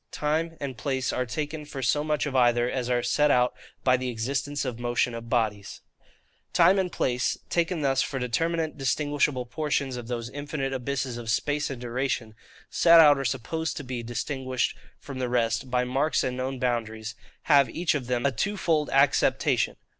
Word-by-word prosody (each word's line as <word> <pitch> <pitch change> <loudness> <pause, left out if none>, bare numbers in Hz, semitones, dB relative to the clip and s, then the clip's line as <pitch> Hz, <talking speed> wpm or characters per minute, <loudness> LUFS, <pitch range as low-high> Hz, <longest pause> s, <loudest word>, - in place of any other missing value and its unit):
Time 160 +2 -1
and 130 -4 -5
Place 130 -1 -1
are 125 - -1
taken 150 +4 -4
for 140 -2 -7
so 145 +4 +2
much 150 -1 0
of 140 -2 -4
either 120 -1 +4
as 125 -1 -2
are 120 -1 +1
set 150 +4 +2
out 125 -2 +3 0.3
by 130 -1 +4
the 130 0 -3
Existence 140 +5 -2
and 120 -3 -4
Motion 120 0 0
of 115 0 -7
Bodies. 105 -5 -1 0.7
Time 180 +3 +5
and 185 -2 -1
place, 125 -1 0
taken 170 -2 0
thus 135 -1 +2
for 135 - -2
determinate 160 +6 -1
distinguishable 145 -1 0
portions 140 -1 -2
of 120 -2 -7
those 120 -1 -3
infinite 145 -1 -3
abysses 130 -1 -3
of 120 -2 -6
space 145 +6 0
and 135 -3 -5
duration, 120 -2 -2 0.4
set 170 -1 +6
out 145 -3 +7
or - - -2
supposed 140 +6 -2
to 145 - -5
be 125 -2 -4
distinguished 130 +2 -2 0.2
from 135 -2 -8
the 125 -1 -1
rest, 120 +1 0
by 125 0 +1
marks 135 +5 +1
and 125 - -2
known 130 +1 -3
boundaries, 110 -3 -2 0.3
have 140 -3 +5
each 175 0 0
of 135 -5 -3
them 125 0 -1
a 140 - +3
twofold 160 - 0
acceptation. 135 +1 +2
130 Hz, 180 wpm, -26 LUFS, 120-150 Hz, 0.7 s, out